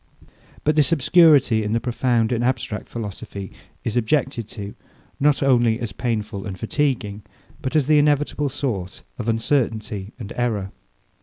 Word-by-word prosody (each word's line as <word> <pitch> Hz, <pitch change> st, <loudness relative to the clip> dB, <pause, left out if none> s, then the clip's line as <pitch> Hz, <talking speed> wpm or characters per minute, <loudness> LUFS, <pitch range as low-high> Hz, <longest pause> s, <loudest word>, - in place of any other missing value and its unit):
But 155 Hz, 0 st, +2 dB
this 150 Hz, -1 st, +3 dB
obscurity 145 Hz, -6 st, +5 dB
in 105 Hz, 0 st, -2 dB
the 115 Hz, -, +2 dB
profound 120 Hz, -1 st, +1 dB
and 120 Hz, -1 st, 0 dB
abstract 120 Hz, -4 st, -2 dB
philosophy, 100 Hz, -3 st, -6 dB, 0.3 s
is 115 Hz, -, -2 dB
objected 125 Hz, -1 st, 0 dB
to, 100 Hz, -2 st, -7 dB, 0.5 s
not 145 Hz, 0 st, +3 dB
only 120 Hz, -4 st, +3 dB
as 115 Hz, -3 st, -4 dB
painful 105 Hz, -4 st, -3 dB
and 95 Hz, -2 st, -6 dB
fatiguing, 115 Hz, -4 st, -1 dB, 0.4 s
but 130 Hz, -, -3 dB
as 150 Hz, -3 st, +4 dB
the 150 Hz, +1 st, +5 dB
inevitable 145 Hz, 0 st, +1 dB
source 115 Hz, -10 st, -4 dB, 0.2 s
of 115 Hz, -1 st, -2 dB
uncertainty 110 Hz, -4 st, -1 dB
and 115 Hz, -4 st, -7 dB
error. 105 Hz, -6 st, -1 dB
120 Hz, 145 wpm, -22 LUFS, 105-140 Hz, 0.5 s, obscurity